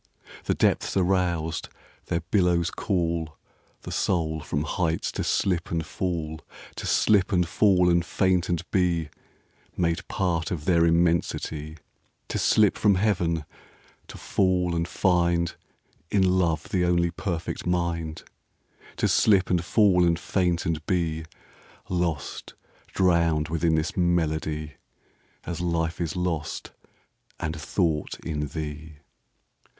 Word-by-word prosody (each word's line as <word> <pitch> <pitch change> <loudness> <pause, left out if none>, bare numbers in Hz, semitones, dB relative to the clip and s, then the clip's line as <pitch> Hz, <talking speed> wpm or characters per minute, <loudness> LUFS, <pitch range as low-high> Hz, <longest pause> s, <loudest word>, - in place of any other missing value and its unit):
The - - +1
depths - - +1
are 95 - +4
roused: 90 -3 0 0.4
their 85 - -1
billows 90 -4 +2
callThe 85 -4 -1 0.6
soul 80 -4 0
from 75 0 -2
heights 80 +1 -1
to - - -3
slip 90 -3 0
and 80 -2 -2
fall; 80 -4 -3 0.4
To - - -4
slip 105 -1 +3
and 90 -3 +2
fall 90 0 +3
and 85 -1 +3
faint 95 -1 +1
and 85 -2 0
beMade 85 0 -3
part 85 -4 -1
of 80 -4 -4
their 85 -2 +4
immensity; 80 -2 0 0.5
To - - -2
slip 105 -2 +3
from 105 -2 +4
Heaven; 90 -6 0 0.6
to - - -10
fall 90 -2 +1
and 85 0 -1
findIn 85 -2 +2 0.7
love 90 -5 +2
the 90 -2 +1
only 85 -1 +2
perfect 85 -1 -4
mind; 85 -3 -1 0.7
To - - +2
slip 95 -4 +3
and 90 -1 +2
fall 95 -1 +4
and 85 -1 +3
faint 90 0 0
and 80 -2 -1
beLost, 85 -1 -4 0.3
drowned 85 -4 +2
within 80 0 +1
this 80 +7 -1
melody, 80 -4 0 0.7
As 85 0 -5
life 85 -1 -1
is 85 0 -2
lost 90 -4 -3 0.7
and 80 0 -3
thought 80 0 -1
in 75 -3 -3
thee. 80 +1 -6
85 Hz, 120 wpm, -26 LUFS, 80-90 Hz, 0.7 s, are